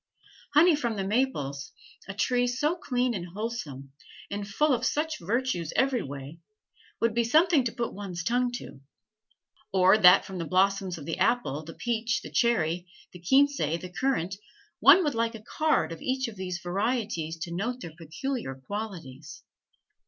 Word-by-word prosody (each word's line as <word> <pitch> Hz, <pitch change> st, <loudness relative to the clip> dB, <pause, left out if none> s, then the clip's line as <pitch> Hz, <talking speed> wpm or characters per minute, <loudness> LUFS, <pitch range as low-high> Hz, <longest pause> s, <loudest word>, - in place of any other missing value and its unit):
Honey 325 Hz, +2 st, +7 dB
from 240 Hz, -6 st, -2 dB
the 195 Hz, -, -2 dB
maples, 190 Hz, -, -1 dB, 0.3 s
a 200 Hz, -, -6 dB
tree 245 Hz, +4 st, +1 dB
so 295 Hz, +7 st, 0 dB
clean 250 Hz, -7 st, -1 dB
and 180 Hz, -4 st, -4 dB
wholesome, 160 Hz, -, -5 dB, 0.4 s
and 200 Hz, 0 st, -4 dB
full 290 Hz, +8 st, +2 dB
of 245 Hz, -, -1 dB
such 310 Hz, +1 st, -1 dB
virtues 200 Hz, -, -1 dB
every 265 Hz, -3 st, +2 dB
way, 140 Hz, +2 st, -8 dB, 0.6 s
would 230 Hz, -1 st, +1 dB
be 235 Hz, +1 st, +2 dB
something 310 Hz, +4 st, +4 dB
to 235 Hz, -, 0 dB
put 235 Hz, 0 st, -3 dB
one's 185 Hz, -4 st, -6 dB
tongue 245 Hz, +5 st, +1 dB
to. 145 Hz, -, -8 dB, 0.9 s
Or 190 Hz, +2 st, +5 dB
that 180 Hz, -1 st, +7 dB
from 190 Hz, -2 st, -7 dB
the 165 Hz, -, -3 dB
blossoms 190 Hz, 0 st, +1 dB
of 145 Hz, -, -9 dB
the 165 Hz, +2 st, -4 dB
apple, 190 Hz, -, +1 dB
the 165 Hz, +1 st, -10 dB
peach, 235 Hz, 0 st, -1 dB
the -, -, -9 dB
cherry, 175 Hz, -7 st, +1 dB, 0.3 s
the 180 Hz, -, -10 dB
quince, 280 Hz, +9 st, +4 dB
the 170 Hz, +4 st, -2 dB
currant, 195 Hz, -9 st, 0 dB, 0.4 s
one 290 Hz, -, +7 dB
would 295 Hz, -4 st, 0 dB
like 230 Hz, 0 st, -1 dB
a 215 Hz, -, -10 dB
card 310 Hz, -, +1 dB
of 165 Hz, -, -8 dB
each 260 Hz, 0 st, -1 dB
of 225 Hz, -, -8 dB
these 185 Hz, -2 st, -4 dB
varieties 195 Hz, -4 st, -1 dB
to 170 Hz, +1 st, -5 dB
note 240 Hz, +8 st, -3 dB
their 165 Hz, -, -8 dB
peculiar 170 Hz, -, -4 dB
qualities. 160 Hz, -3 st, -7 dB
205 Hz, 165 wpm, -28 LUFS, 170-250 Hz, 0.9 s, Honey